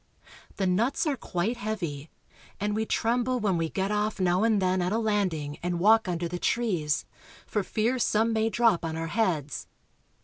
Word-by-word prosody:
The 195 - -1
nuts 220 - +1
are 300 -3 +1
quite 215 0 -2
heavy, 170 -10 -4 0.5
and 205 +2 -1
we 220 0 -1
trem 240 +2 +1
ble 255 +1 0
when 205 -4 +1
we 165 -1 -1
get 195 +3 -1
off 210 0 -1
now 180 0 +2
and 225 -2 +3
then 185 -1 +1
at 180 +1 0
a 220 - +1
landing 185 -10 -1
and 175 0 -2
walk 220 +3 +5
under 175 -1 -1
the 175 +1 -5
trees, 170 - 0 0.4
for 210 - -1
fear 230 +6 0
some 225 0 +2
may 220 0 +1
drop 230 -6 +2
on 160 -1 -3
our 165 0 -3
heads. 165 - -1
200 Hz, 190 wpm, -27 LUFS, 175-225 Hz, 0.5 s, walk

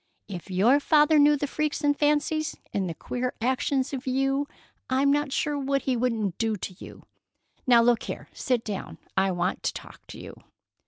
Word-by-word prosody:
If 185 -2 -8
your 215 +10 +4
father 300 +1 +4
knew 295 0 +5
the 290 - -1
freaks 300 +1 -2
and 290 0 +3
fancies 300 +1 0 0.2
and 190 -3 -1
the 165 - -5
queer 250 +7 -3
actions 260 +3 0
of 270 0 -5
you 270 +2 +1 0.4
I'm 270 +2 +3
not 290 0 +1
sure 290 +1 -1
what 275 0 0
he 260 - 0
wouldn't 225 -6 -1
do 225 -1 +1
to 185 - -6
you! - - -12 0.6
Now, 240 -2 +6
look 240 -1 +3
here! - - -6
Sit 250 -3 -1
down. 205 -3 -5 0.2
I 195 0 +3
want 180 0 -1
to - - -1
talk - - -11
to - - -10
you." - - -11
260 Hz, 190 wpm, -26 LUFS, 225-290 Hz, 0.6 s, Now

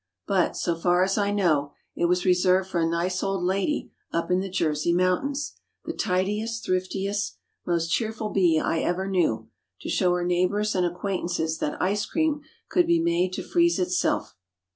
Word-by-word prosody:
But, 190 -3 +1
so 170 - 0
far 175 +2 +2
as 195 +1 +1
I 205 -1 +1
know, 160 -8 +1 0.2
it - - +1
was 180 +1 +1
reserved 185 +1 +3
for 175 - 0
a 165 - +2
nice 180 +2 -1
old 195 -2 -1
lady 195 +11 0 0.2
up 170 +2 -1
in 180 - +3
the 195 +1 -3
"Jersey" 160 -3 0
mountains—the 185 +12 -2
tidiest, 210 +5 -1
thriftiest, 195 +2 -1 0.3
most 170 -1 0
cheerful 220 0 -1
bee 175 -6 +3
I 165 - 0
ever 185 +3 -1
knew—to 175 - -2
show 180 -1 +2
her 175 0 -1
neighbors 185 +4 +1
and 180 -2 +2
acquaintances 175 -3 -2
that 150 - -2
ice 205 +3 0
cream 315 -2 0 0.3
could 355 -1 +2
be 170 - +4
made 170 +2 +1
to - - -3
freeze 345 -4 +2
itself. 180 - 0
185 Hz, 165 wpm, -25 LUFS, 175-200 Hz, 0.3 s, be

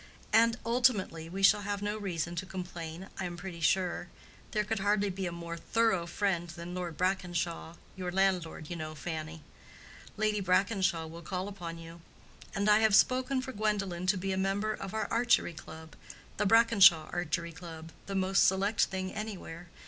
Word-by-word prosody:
And 230 +1 +5
ultimately, 230 -9 +1
we 195 +3 -4
shall 205 +1 +6
have 205 0 -3
no 205 +1 -1
reason 175 -5 -3
to 185 - -2
complain, 175 -1 -6
I 190 - -2
am 175 -1 -5
pretty 175 -1 -7
sure. 175 +1 +1 0.4
There 210 -1 0
could 215 0 -2
hardly 205 0 +1
be 190 0 -3
a - - -3
more 170 0 -6
thorough 190 0 +1
friend 175 -1 -1
than 170 +2 -7
Lord 175 -3 -4
Brackenshaw—your 180 -1 -3
landlord, 180 -4 0
you - - -2
know, 155 -1 -6
Fanny. 160 +1 -6 0.7
Lady 210 -1 +1
Brackenshaw 185 -2 +1
will 165 +1 -9
call 185 +3 -4
upon 175 -5 -6
you. 165 0 -11 0.5
And 200 +1 0
I 210 0 +6
have 220 -2 +4
spoken 255 +3 +3
for 260 - -5
Gwendolen 195 -5 -1
to 190 +1 +3
be 190 +1 -2
a 190 - -1
member 195 +3 0
of 195 0 -6
our 220 - -1
Archery 235 -6 +3
Club—the 160 +4 -7
Brackenshaw 195 -7 +6
Archery 170 0 -2
Club—the 165 +3 -9
most 190 0 +4
select 195 +3 +2
thing 185 0 -4
anywhere. 190 -5 -6
185 Hz, 165 wpm, -31 LUFS, 170-205 Hz, 0.7 s, shall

